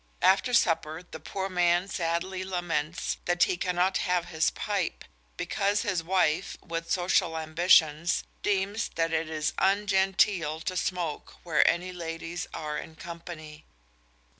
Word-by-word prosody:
After 195 +6 +4
supper 165 -6 +2
the 160 - -10
poor 190 +5 -4
man 175 0 +2
sadly 185 +1 -2
laments 175 -4 -2
that 175 0 +3
he - - +2
cannot 180 +1 +1
have 180 -1 0
his 160 -2 +2
pipe, 200 -5 -3 0.3
because 200 +1 0
his 185 -4 0
wife, 180 0 +1
with 165 -1 -5
social 175 -2 +2
ambitions, 160 0 +3 0.2
deems 205 +2 0
that 165 0 0
it 160 0 0
is 155 -1 -1
"ungenteel 190 -4 +2
to 185 - -3
smoke, 175 -4 -3
where 165 -3 +3
any 180 +1 -1
ladies 165 0 -5
are 150 -1 -4
in 160 - -10
company." 165 -2 -9
175 Hz, 135 wpm, -28 LUFS, 160-190 Hz, 0.3 s, After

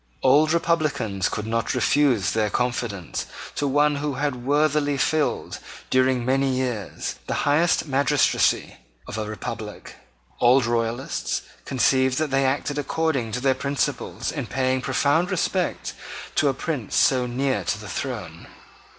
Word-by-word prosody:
Old 145 +4 +5
republicans 155 - 0
could 105 - -4
not 115 +2 -1
refuse 125 -5 +2
their 110 -1 +1
confidence 120 -6 -2 0.3
to 145 - -1
one 145 +1 +3
who 145 -1 -2
had 130 -3 -2
worthily 145 0 +2
filled, 150 0 0 0.3
during 130 -1 +2
many 135 +1 +2
years, 125 -6 -3
the - - -1
highest 155 +4 +3
magistracy 140 -2 +2 0.3
of 110 - -5
a 105 - -3
republic. 105 -2 -7 0.4
Old 125 0 +5
royalists 115 - -1 0.2
conceived 130 0 +2
that 155 -2 0
they 135 0 +2
acted 145 +2 -1
according 145 -5 -1
to 125 - -1
their 135 +1 +3
principles 140 +2 -2
in - - -4
paying 130 0 0
profound 160 +7 +1
respect - - -1 0.4
to - - +2
a - - +1
prince - - -3
so 125 -2 +3
near 130 -4 -1
to 100 +5 -1
the 105 - -9
throne. 100 - -5
130 Hz, 140 wpm, -24 LUFS, 120-145 Hz, 0.4 s, Old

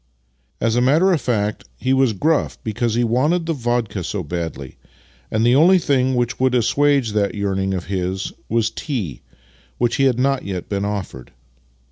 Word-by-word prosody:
" 65 +1 -44
As 110 - 0
a 120 - +3
matter 155 +9 +4
of 160 - 0
fact, 105 -3 -1
he 130 +1 0
was 130 -4 +3
gruff 155 +10 0
because 110 +1 -1
he 120 - +2
wanted 150 +9 +1
the 165 - -1
vodka 120 - -2
so 95 +2 -3
badly, 80 -5 -5 0.5
and 110 +1 +1
the 120 - +4
only 175 +6 +6
thing 130 -5 +1
which 120 0 -1
would 130 -1 +2
assuage 130 0 +2
that 100 -2 0
^'earning 95 -2 -1
of 90 - -6
his 95 0 -3 0.2
was 115 0 +1
tea 105 - -4 0.3
— 60 0 -32
which 120 +2 +1
he 135 - +3
had 130 -3 +2
not 135 +1 +1
yet 95 -3 -5
been 100 -1 -1
offered. 100 -11 -5
115 Hz, 185 wpm, -20 LUFS, 95-130 Hz, 0.5 s, only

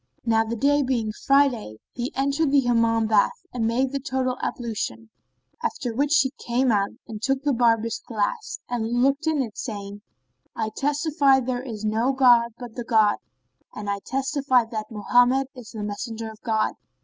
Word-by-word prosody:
Now 225 -1 +3
the 225 +1 -4
day 285 +5 +3
being 245 -5 0 0.2
Friday, 275 - +3 0.2
he 245 +1 -4
entered 280 +2 +1
the 280 -1 +5
Hammam 230 -2 +2
bath 215 -2 +2
and 230 -3 0
made 255 +3 +1
the 280 - -2
total 260 -1 -1
ablution: 160 - -4 0.5
after 245 -3 -2
which 285 +5 +3
he 265 0 -1
came 250 +1 +1
out 200 -2 +2 0.2
and 215 -3 -7
took 270 +3 0
the 290 -1 +2
barber's 230 -2 +1
glass 230 - -2
and 240 0 0
looked 275 +3 +1
in 305 -4 +2
it, 220 -4 -8
saying, 205 -3 -6 0.5
"I 220 -1 -2
testify 290 -1 +2
that - - -6
there 250 -1 -2
is 220 -5 -6
no 225 +5 +1
god 240 -3 +5
but 245 -3 -9
the 240 - -5
God 220 -3 +3 0.6
and 205 -1 -3
I 200 - -2
testify 270 -2 +1
that 215 -2 -4
Mohammed 245 +5 +2
is 250 -4 -11
the 215 -2 -6
Messenger 220 +2 -5
of 220 - -16
God!" 220 -1 0
240 Hz, 175 wpm, -24 LUFS, 220-270 Hz, 0.6 s, the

